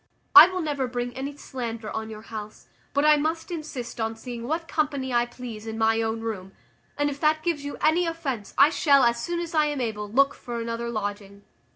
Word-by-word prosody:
I 365 -3 +13
will 370 0 -3
never 285 -5 -1
bring 245 0 -3
any 275 +2 -5
slander 230 -6 -5
on 220 0 -4
your 215 0 -9
house; 215 -2 -8 0.3
but 285 +1 +1
I 305 0 +7
must 320 +4 -2
insist 295 -8 -5
on 225 0 -1
seeing 235 0 -7
what 325 +3 -2
company 285 -5 -1
I 240 0 +2
please 235 -3 -8
in 220 0 -4
my 225 0 +2
own 225 0 -2
room; 195 -4 -5 0.4
and 290 0 +1
if 285 -1 -4
that 310 0 +2
gives 335 -5 -1
you 285 - -5
any 335 +3 +3
offence, 275 -10 -4
I 285 +3 +7
shall, 280 -5 +4
as 235 0 +2
soon 345 0 -2
as 340 0 -5
I 305 -1 +4
am 295 -2 -2
able, 210 -4 -3
look 275 +5 +3
for 240 -1 -6
another 230 0 -3
lodging." 205 -2 -5
250 Hz, 215 wpm, -25 LUFS, 225-300 Hz, 0.4 s, I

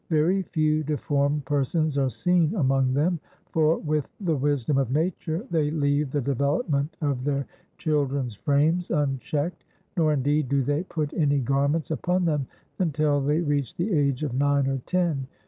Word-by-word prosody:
Very 170 +4 +2
few 155 -3 +1
deformed 145 -1 0
persons 145 +2 0
are 135 -2 +2
seen 175 - +1
among 135 -5 +2
them; 165 +4 +1 0.3
for, 160 0 +3
with 150 -2 -2
the 175 -6 0
wisdom 140 -1 +1
of 135 -4 0
nature, 165 - -1
they 155 -3 +2
leave 145 -1 +1
the 145 - -1
development 140 - 0
of 140 -4 -1
their 140 -1 -1 0.3
children's 140 -5 0
frames 150 - +1
unchecked, 145 +2 -1 0.3
nor, 160 -4 +3
indeed, 145 0 +1
do 140 -1 +2
they 145 +4 0
put 155 -5 -3
any 145 -3 +2
garments 140 +5 0
upon 180 +3 0
them 150 -5 0 0.3
until 150 -4 +1
they 150 +4 +1
reach 145 -6 -1
the 185 +4 -1
age 140 -2 +1
of 140 -5 -2
nine 140 +1 +2
or 135 0 -1
ten. 170 -7 0
145 Hz, 160 wpm, -25 LUFS, 140-160 Hz, 0.3 s, for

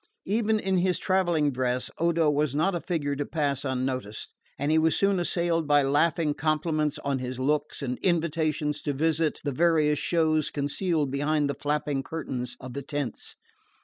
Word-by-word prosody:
Even 215 +1 +1
in 190 -2 0
his 180 0 +2
travelling 175 -6 +1
dress 125 -1 -1
Odo 170 -1 +2
was 145 -1 +1
not 160 +6 +2
a 175 - -2
figure 145 -5 -2
to 145 - -1
pass 140 -3 -1
unnoticed, 130 -5 -3 0.2
and 145 +2 0
he 160 - +4
was 160 0 +3
soon 195 -1 +2
assailed 170 -2 0
by 145 -1 +5
laughing 150 +2 +2
compliments 155 -1 0
on 140 -2 0
his 125 0 -5
looks 150 +2 -1
and 125 -2 -3
invitations 155 -3 0
to 145 - -2
visit 160 +2 0
the 145 - -1
various 155 0 +2
shows 155 -3 +1
concealed 150 +1 -1
behind 145 +1 +1
the 140 - -1
flapping 145 -1 -1
curtains 130 -5 -5
of 130 -1 -8
the 140 - -4
tents. 140 -4 -4
150 Hz, 170 wpm, -27 LUFS, 140-165 Hz, 0.2 s, by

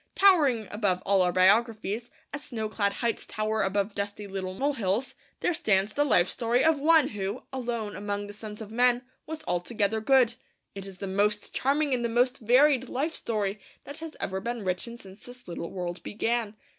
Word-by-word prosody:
Towering 290 - +4
above 200 -4 0
all 195 -1 +4
our 180 -1 +3
biographies, 215 +4 +2 0.2
as 295 - -3
snowclad 215 -3 -1
heights 230 - -1
tower 215 0 -1
above 200 +1 0
dusty 200 +1 -4
little 190 -1 -5
molehills, 240 -3 0 0.3
there 355 - +2
stands 210 - +1
the 290 - +2
life 185 -11 +4
story 235 +4 +1
of 320 -2 +4
One 320 +2 +5
who, 205 +3 -4
alone 235 -5 -3
among 205 0 -3
the 205 - -9
sons 210 0 -8
of 215 -1 -8
men, 245 +1 +3 0.2
was 315 0 -6
altogether 205 +4 0
good. 255 -1 +4 0.4
It 195 0 -7
is 190 -1 -9
the 195 - -5
most 205 +2 0
charming 285 +1 +1
and 245 -1 0
the 235 - 0
most 250 +3 +2
varied 260 +2 +4
life 300 +6 -2
story 210 -2 -2 0.2
that 285 +2 -8
has 320 -1 -7
ever 190 0 -2
been 235 +1 -4
written 185 +6 -2
since 195 -2 -13
this 245 0 -12
little 170 -1 -5
world 180 -1 -5
began. 225 0 -1
220 Hz, 180 wpm, -28 LUFS, 200-250 Hz, 0.4 s, One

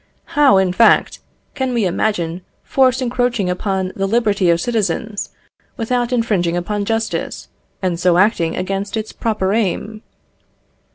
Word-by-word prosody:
How, 285 -8 +5
in 190 -1 +2
fact, 230 +4 +4 0.3
can 260 -3 -2
we 225 -4 +1
imagine 175 -2 -1 0.2
force 260 -1 +2
encroaching 245 -6 0
upon 190 0 -2
the 195 0 -1
liberty 205 -4 +2
of 170 0 +3
citizens 215 0 -2 0.5
without 245 +1 -1
infringing 205 -8 +1
upon 205 +3 -2
justice, 225 +1 -3 0.3
and 175 -2 -1
so 175 -1 +3
acting 180 -4 +2
against 195 +3 -3
its 220 0 -4
proper 210 -4 -1
aim? 215 0 -1
210 Hz, 130 wpm, -18 LUFS, 185-230 Hz, 0.5 s, How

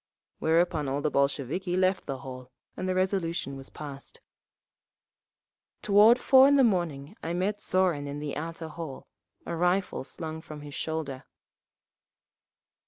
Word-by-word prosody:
Whereupon 165 -2 +2
all 140 +2 -1
the 150 0 0
Bolsheviki 140 +7 0
left 185 0 +1
the 135 -2 -3
hall 130 -1 -8 0.3
and 185 - -3
the 185 - 0
resolution 185 -6 -1
was 135 0 -6
passed…. 140 -2 -9 1.6
Toward 210 +4 +7
four 260 +1 +7
in 285 - +5
the 275 - +6
morning 175 - 0
I 165 - -3
met 195 +4 -1
Zorin 180 -6 +1
in 140 +1 -5
the 145 -1 -4
outer 165 +1 -5
hall, 155 -4 -7 0.4
a 170 - -3
rifle 180 +1 +1
slung 160 +3 -6
from 155 -2 -9
his 145 -1 -9
shoulder. 155 -5 -4
165 Hz, 140 wpm, -28 LUFS, 145-185 Hz, 1.6 s, Toward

